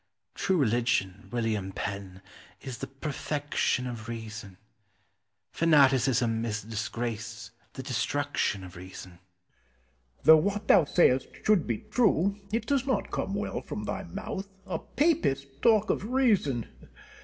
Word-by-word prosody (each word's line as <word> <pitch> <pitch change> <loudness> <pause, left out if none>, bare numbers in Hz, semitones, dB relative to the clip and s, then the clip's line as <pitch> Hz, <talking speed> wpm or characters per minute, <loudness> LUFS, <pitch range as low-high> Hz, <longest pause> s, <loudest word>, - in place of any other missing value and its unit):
True 190 - +1
religion, 115 - 0
William 110 -5 -1
Penn, 95 -1 -5 0.4
is 130 -4 -7
the - - -4
perfection 145 -1 -2
of 115 -3 -6
reason; 110 -4 -7 0.9
fanaticism 130 -7 +3
is 110 -2 -2
the 110 - -14
disgrace, 115 +1 -4 0.2
the 130 - -7
destruction 130 -5 -1
of 90 -1 -10
reason. 90 +1 -9
Penn. 60 -9 -30
Though 160 - +9
what 200 +5 -1
thou 165 - +6
sayest 130 -5 +3 0.2
should 210 -6 +3
be 115 -3 -3
true, 200 -5 +3 0.2
it 230 +2 -1
does 275 -2 0
not 205 -7 0
come 195 - -2
well 205 - -3
from 210 - -6
thy 200 - -3
mouth. 195 +1 -6 0.2
A 170 -3 -3
Papist 140 - 0
talk 220 -2 +4
of - - -2
reason! 205 - +2
130 Hz, 130 wpm, -28 LUFS, -, 0.9 s, Though